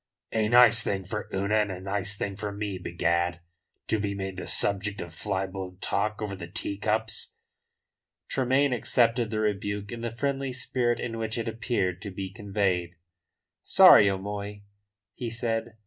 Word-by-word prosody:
A 110 -1 +1
nice 120 -1 +7
thing 95 -3 -2
for 95 - -5
Una 100 +3 +1
and 105 -2 +1
a 90 - -6
nice 100 +1 -2
thing 100 -1 -3
for 105 +1 -4
me, 100 -2 -4
begad, 85 0 0 0.5
to 110 - +1
be 100 -1 -2
made 95 -1 -4
the 90 - -6
subject 100 +1 +1
of 85 -2 -6
fly 95 +1 -2
blown 95 -1 -7
talk 105 +3 -1
over 100 -2 -3
the 85 -3 -8
tea 100 +3 -3
cups." 110 +1 -1 0.9
Tremayne 135 +1 +2
accepted 120 -1 +2
the 110 -1 -2
rebuke 100 -1 -2
in 120 -1 -6
the 115 - -2
friendly 135 +2 -2
spirit 120 -2 0
in 115 -1 -4
which 110 0 -3
it 115 0 -3
appeared 105 -5 -1
to 105 - -5
be 95 0 -6
conveyed. 95 -5 -1 0.7
"Sorry, 100 - +8
O'Moy," 100 +1 -5 0.5
he 120 - -4
said. 115 -1 -2
105 Hz, 165 wpm, -27 LUFS, 95-115 Hz, 0.9 s, Sorry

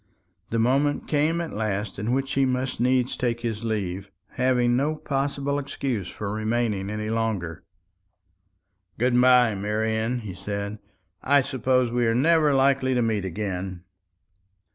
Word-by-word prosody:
The 115 - -1
moment 135 +5 +1
came 155 +3 +1
at 165 - -5
last 105 -2 -2
in 105 +4 -1
which 135 +1 -1
he 135 - +2
must 130 0 -1
needs 125 +1 +2
take 120 -1 -1
his 115 -2 -3
leave, 100 -3 -3 0.2
having 125 -1 +2
no 145 +5 +1
possible 140 0 -1
excuse 130 -8 -3
for 105 -1 -5
remaining 110 -2 -1
any 105 +1 -3
longer. 105 -8 -2 1.3
"Good 125 +1 +3
bye, 125 -3 +5
Marian," 110 +4 -1
he 105 -4 -7
said. 100 +2 -5 0.4
"I 140 +1 +4
suppose 130 -2 +1
we 120 -1 +1
are 115 - +2
never 155 +3 +4
likely 135 -1 +3
to 120 - +2
meet 110 -4 0
again." 95 -1 -4
120 Hz, 140 wpm, -25 LUFS, 105-130 Hz, 1.3 s, bye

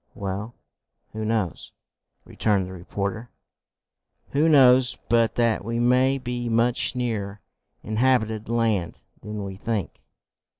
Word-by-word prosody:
"Well, 100 +2 -5 0.6
who 110 0 -4
knows," 110 -6 -2 0.5
returned 100 -4 0
the 95 - -9
reporter, 100 +6 -4 1.0
"who 150 +4 +3
knows 130 -3 +6
but 115 0 +3
that 115 -3 +1
we 115 +2 -3
may 125 +3 +3
be 120 -2 -4
much 115 +2 +1
nearer 105 -5 -3 0.4
inhabited 110 -1 0
land 110 -7 0 0.2
than 105 -1 -6
we 95 -1 -7
think?" 110 -2 -4
115 Hz, 115 wpm, -24 LUFS, 105-120 Hz, 1.0 s, knows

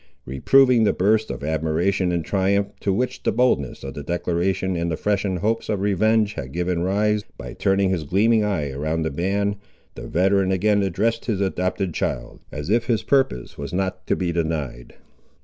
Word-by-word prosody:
Reproving 125 - +4
the 105 - +3
burst 110 +3 +2
of - - -6
admiration 80 +5 0
and 85 -2 -1
triumph, 100 +2 +1
to 100 - 0
which 125 +7 -1
the - - +1
boldness 120 - 0
of 70 0 -6
the 75 - -6
declaration, 90 +3 -1
and 85 0 -1
the 80 - -2
freshened 100 -2 0
hopes 110 +6 -1
of 105 -3 0
revenge 105 +2 +2
had 65 - -6
given 90 0 -1
rise, 105 +3 +1
by - - -8
turning 95 -1 +1
his 85 -4 -1
gleaming 105 +8 +3
eye 85 -9 -1
around 80 +4 -2
the 80 - -2
band, 100 +6 -1 0.4
the - - -8
veteran 95 +2 +2
again 100 +2 +2
addressed 105 +5 0
his 110 -6 -1
adopted 95 -1 -1
child, - - -3
as 75 +5 -4
if 115 0 +2
his 115 -4 +1
purpose 130 - 0
was 70 +2 -6
not 95 0 -2
to - - +2
be 90 -2 -1
denied. 80 -8 -3
95 Hz, 185 wpm, -22 LUFS, 85-105 Hz, 0.4 s, Reproving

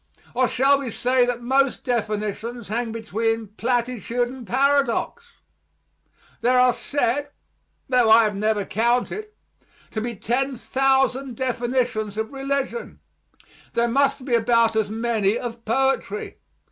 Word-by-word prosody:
Or 255 +1 +2
shall 275 +4 +3
we 270 -3 -4
say 250 +2 +2
that 245 -1 -2
most 265 +2 +1
definitions 215 0 -3
hang 230 +1 -2
between 225 0 -2
platitude 240 +1 -1
and 255 -2 -10
paradox? 280 - +1 1.2
There 250 +1 +3
are 250 -1 +5
said, 280 +2 -1 0.6
tho 250 -3 +3
I 225 +1 +8
have 210 -2 0
never 210 0 0
counted, 245 - 0 0.6
to 215 - -3
be 235 +1 -4
10,000 265 +2 0
definitions 245 -4 -1
of 220 +3 -3
religion. 275 - -3 0.7
There 235 0 +2
must 275 +2 +1
be 255 - -2
about 230 -1 +3
as 220 -2 +1
many 220 -1 0
of 235 -1 -6
poetry. 245 -3 -1
240 Hz, 120 wpm, -23 LUFS, 225-265 Hz, 1.2 s, I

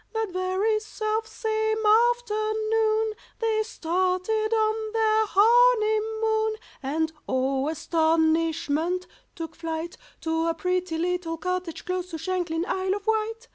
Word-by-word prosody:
That 445 -3 -1
very 375 +4 +1
self 435 0 -3
same 440 -1 -1 0.3
afternoon 435 -1 0 0.2
They 445 -1 +1
started 370 +2 0
on 435 0 0
their 440 -1 +3
honeymoon, 440 -1 +3 0.3
And 315 +4 -1 0.2
(oh, 265 +2 +1
astonishment!) 325 +1 +1 0.3
took 325 -1 -6
flight 325 +1 -5 0.2
To 325 0 0
a 330 - 0
pretty 360 -1 -1
little 350 -1 -1
cottage 365 -1 -3
close 365 0 -3
to 330 - -5
Shanklin, 350 -1 -2
Isle 380 +1 0
of 410 -1 -7
Wight. 445 +1 -1
375 Hz, 115 wpm, -26 LUFS, 330-440 Hz, 0.3 s, their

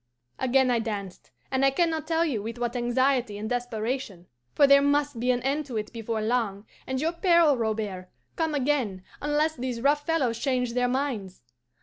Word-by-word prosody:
"Again 260 0 +3
I 240 - +2
danced, 205 -5 -5 0.2
and 265 0 +1
I 275 - +6
can 330 +5 +1
not 315 -1 -4
tell 330 0 +2
you 250 -10 -1
with 225 +3 -6
what 240 0 -2
anxiety 245 -2 +1
and 215 +1 -4
desperation 235 -5 -3 0.3
for 285 - +6
there 280 0 +7
must 285 -2 +1
be 245 +2 -1
an 245 -1 +1
end 285 +3 -1
to 245 -4 -4
it 215 +2 -4
before 225 -1 -3
long, 220 -3 -1 0.2
and 260 0 -2
your 320 +4 +1
peril, 340 -4 +4
Robert, 215 -5 -3 0.3
come 320 -2 -1
again, 255 -9 0 0.2
unless 300 +2 +1
these 250 -2 -4
rough 290 +4 +2
fellows 275 -8 0
changed 250 -2 0
their 250 0 +1
minds. 245 - -3
250 Hz, 190 wpm, -26 LUFS, 225-285 Hz, 0.3 s, there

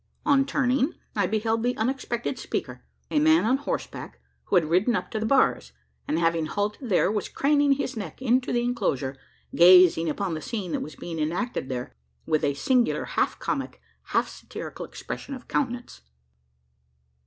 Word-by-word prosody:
On 275 -2 +4
turning, 270 +1 +1 0.2
I - - +2
beheld 225 +1 0
the 245 +2 0
unexpected 240 +1 -2
speaker - - -4 0.3
a 300 - +3
man 315 -1 +4
on 255 +4 +3
horseback, 285 - -5 0.3
who - - 0
had 175 -3 +5
ridden 185 +9 +2
up - - -3
to 220 - -2
the 220 - -1
bars; 220 - +2 0.3
and 155 - 0
having 165 -1 +1
halted 210 - -3
there 190 0 +3
was 210 -2 -2
craning 285 0 +3
his 275 -1 -3
neck 200 -8 -6
into 255 0 +1
the 240 0 +1
enclosure 185 - -1 0.4
gazing 175 -2 +7
upon 185 +3 -2
the 155 - -4
scene 200 -5 -4
that - - -1
was 155 - -7
being 165 +2 -6
enacted 170 - -2
there, 125 -1 -4 0.3
with 155 - +1
a 140 - +1
singular 245 - +1
half - - 0
comic, - - -3 0.3
half - - +1
satirical - - -8
expression 275 - -7
of 255 - -12
countenance! 245 -2 -3
220 Hz, 165 wpm, -26 LUFS, 170-255 Hz, 0.4 s, gazing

